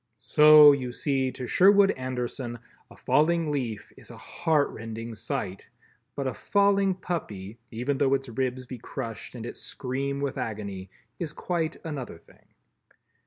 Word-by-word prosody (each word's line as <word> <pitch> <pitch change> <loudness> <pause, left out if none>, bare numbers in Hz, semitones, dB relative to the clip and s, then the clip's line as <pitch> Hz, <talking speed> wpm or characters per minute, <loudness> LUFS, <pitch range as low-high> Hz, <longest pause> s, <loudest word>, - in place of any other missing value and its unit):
So, 150 -1 +8
you 130 -3 -1
see, 135 0 0
to 125 - -6
Sherwood 195 +7 +5
Anderson 125 -1 -4 0.3
a - - -16
falling 165 0 +2
leaf 125 -7 -4
is - - -15
a - - -11
heart 160 -4 0
rending 115 +1 -7
sight, 110 -5 -5 0.5
but 140 - -3
a 130 - -1
falling 200 - +2
puppy, 115 - -5
even 125 +4 -2
though 135 -1 +3
its 135 0 -4
ribs 130 +1 -2
be 125 -1 -8
crushed 115 +1 -7
and 115 -2 -6
it - - -7
scream 140 +2 -4
with 140 -1 -3
agony, 100 -5 -5 0.3
is 160 -3 -4
quite 165 -2 -2
another 140 - -5
thing. 85 - -24
135 Hz, 150 wpm, -27 LUFS, 120-150 Hz, 0.5 s, So